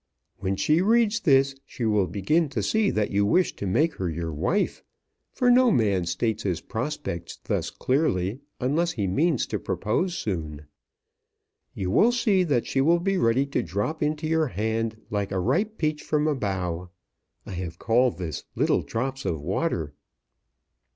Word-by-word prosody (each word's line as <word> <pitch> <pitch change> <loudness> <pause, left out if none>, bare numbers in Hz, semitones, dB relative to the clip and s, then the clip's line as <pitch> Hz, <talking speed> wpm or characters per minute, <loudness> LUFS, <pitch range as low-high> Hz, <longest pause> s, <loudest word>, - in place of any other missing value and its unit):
When 95 +1 -1
she 155 - +2
reads 225 +2 +3
this 135 -7 +4
she 120 - -5
will 105 -4 +2
begin 120 - +1
to 135 - -2
see 220 -2 +2
that 105 -1 0
you 100 +1 +2
wish 175 - +2
to 100 - -3
make 150 - +2
her 90 -2 -1
your 80 0 -4
wife, 95 - 0 0.5
for 250 -2 +3
no 250 0 +6
man 100 - +2
states 110 +5 -1
his 90 -6 -1
prospects 110 - -4
thus - - -1
clearly 125 - 0 0.2
unless 160 +7 +1
he 105 -4 -2
means 145 - +1
to - - -3
propose 175 - -1
soon. 80 -7 -4 1.1
You 95 -1 -2
will 230 - +5
see 215 -6 +2
that 135 -7 +1
she 135 - 0
will 170 +5 +4
be 195 +2 0
ready 120 +2 +3
to 140 - -1
drop 105 - -3
into 150 +1 -1
your 160 0 +2
hand 110 0 -2
like 100 -2 -1
a 95 - 0
ripe 200 - 0
peach 155 -1 -1
from 150 -1 0
a 155 - +2
bough. 90 -7 -3 0.6
I - - -8
have 90 -2 -5
called 120 -3 +2
this 85 -5 -5
'Little - - +2
Drops 135 +4 -3
of 80 - -2
Water.'" 75 - -2
120 Hz, 170 wpm, -25 LUFS, 95-160 Hz, 1.1 s, no